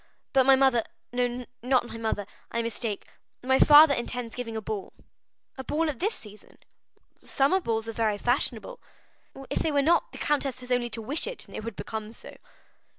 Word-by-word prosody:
But 265 -1 +4
my 270 - +8
mother—no, 245 -1 0 0.2
not 250 +1 +2
my 230 - -8
mother; 220 -3 -2 0.2
I 235 - -2
mistake—my 230 +3 -3
father 295 0 +8
intends 240 -2 -3
giving 230 -3 -5
a - - -1
ball." 210 -2 -5 0.7
"A - - -4
ball 310 +3 0
at 265 - -13
this 420 +5 0
season?" 210 -1 -14 0.6
"Summer 280 +8 +1
balls 225 -8 -2
are 220 -2 0
fashionable." 260 - -1 0.7
"If - - 0
they 320 - 0
were 285 -1 +2
not, 340 +4 +2
the - - -10
countess 275 -4 -1
has 250 0 -9
only 245 -1 +1
to 225 0 -4
wish 290 - -1
it, - - -5
and - - -16
they - - -5
would 225 -1 -6
become 220 +1 -5
so." - - -13
245 Hz, 175 wpm, -27 LUFS, 225-275 Hz, 0.7 s, my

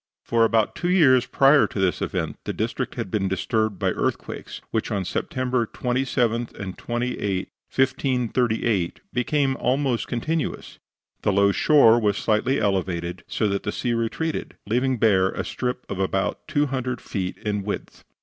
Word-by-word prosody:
For 115 -1 +2
about 110 -1 +2
two 175 - -2
years 140 -9 +5
prior 140 +2 +5
to - - -6
this 95 -4 +1
event - - -2
the - - -2
district - - -3
had 95 - -4
been 100 -3 0
disturbed 110 +2 0
by - - +1
earthquakes, - - -3
which - - -1
on 100 -2 -1
September 125 +3 -1
27 120 -2 0
and 95 -2 -5
28, 120 -6 -2 0.2
1538, 120 -7 +1
became 135 +2 +1
almost 130 -1 0
continuous. 155 +7 -3 0.4
The 105 - +2
low 100 +1 +4
shore 120 -1 +5
was 105 -2 +1
slightly 110 +5 +1
elevated, 90 -3 -1
so 110 - 0
that 100 0 -1
the 105 - -3
sea 120 +2 -1
retreated, 115 +8 -2
leaving 125 +4 +1
bare 95 -4 +4
a - - -3
strip 125 0 -3
about 95 0 -2
two 145 0 +2
hundred 130 -3 -2
feet 95 -3 -4
in 105 -1 -2
width. 100 +1 -6
115 Hz, 150 wpm, -24 LUFS, 100-130 Hz, 0.4 s, years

